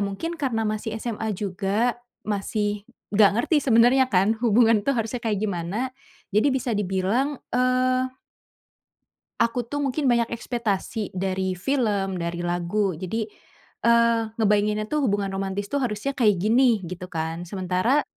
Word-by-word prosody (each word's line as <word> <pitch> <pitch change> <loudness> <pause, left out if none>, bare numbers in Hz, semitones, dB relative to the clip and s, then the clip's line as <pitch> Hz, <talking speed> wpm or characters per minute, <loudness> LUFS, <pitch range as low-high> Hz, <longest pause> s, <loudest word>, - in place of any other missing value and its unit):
mungkin 265 +13 -4
karena 250 -7 -1
masih 215 +1 -2
SMA 225 -2 -3
juga 205 +5 -1 0.3
masih 205 0 -1 0.3
enggak 205 -1 +6
ngerti 310 +7 +2
sebenernya 245 +2 +5
kan, 195 +4 +3
hubungan 230 0 +5
tuh 275 - +3
harusnya 230 +2 -3
kayak 215 -3 0
gimana, 175 -2 -3 0.6
jadi 215 +7 +4
bisa 260 -2 -1
dibilang 205 +8 0 0.2
eee 255 0 +2 1.4
aku 235 +1 +1
tuh 290 +5 -4
mungkin 280 +1 -1
banyak 235 -1 +2
ekspektasi 225 -3 -3
dari 190 0 -1
film, 200 -4 0
dari 170 0 -3
lagu 175 +3 0
jadi, 190 +7 -3 0.6
eee, 235 0 +4
ngebayanginnya 210 -1 +2
tuh 300 -2 +1
hubungan 200 -2 0
romantis 195 +1 -3
tuh, 285 - +1
harusnya 240 +2 -2
kayak 210 -5 +4
gini 230 +1 +3
gitu 180 +1 -7
kan. 165 0 -4
Sementara, 190 - +1
215 Hz, 135 wpm, -24 LUFS, 195-240 Hz, 1.4 s, enggak